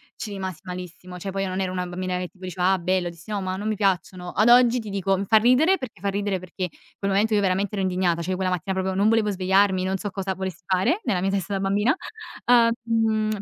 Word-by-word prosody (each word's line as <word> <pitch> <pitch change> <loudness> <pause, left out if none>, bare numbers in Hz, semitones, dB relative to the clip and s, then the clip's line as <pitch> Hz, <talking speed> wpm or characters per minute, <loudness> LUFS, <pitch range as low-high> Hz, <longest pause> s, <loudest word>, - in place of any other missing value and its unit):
ci 215 - -6
rimasi 190 -4 -5
malissimo, 180 0 -8
cioè 195 - -5
poi 195 +1 -2
io 190 - -2
non 185 +1 -3
ero 185 -1 -1
una 180 -1 -2
bambina 180 +1 -3
che 180 -1 -4
tipo 185 0 -12
diceva: 180 +1 +1
"Ah 190 - +2
bello". 180 0 0
Dissi: 170 +3 -14
"No, 205 -1 -1
ma 185 0 -3
non 205 +2 -4
mi 215 - 0
piacciono". 185 -2 -1
Ad 215 +3 +2
oggi 245 0 +6
ti 220 -2 -7
dico 195 -1 0
fa 220 - +4
ridere, 255 - +4
perché 255 - -8
fa 200 - -3
ridere 200 -1 -1
perché 185 0 -5 0.3
quel 200 0 -2
momento 210 +3 +2
io 205 - +3
veramente 195 +1 0
ero 195 - -1
indignata, 180 -2 +1
cioè 170 - -5
io - - 0
quella 185 0 0
mattina 180 +2 -2
proprio 190 0 -1
non 200 +3 +3
volevo 225 -2 +2
svegliarmi, 190 0 +2
non 190 +1 -1
so 205 - -4
cosa 195 -1 -3
volessi 190 -2 -5
fare 190 - +1
nella 185 - 0
mia 190 +2 0
testa, 200 0 -2
da - - -1
bambina. 200 +5 +2 0.5
Ah, 235 -1 +5
mhmm, 220 -2 0
195 Hz, 255 wpm, -24 LUFS, 185-210 Hz, 0.5 s, oggi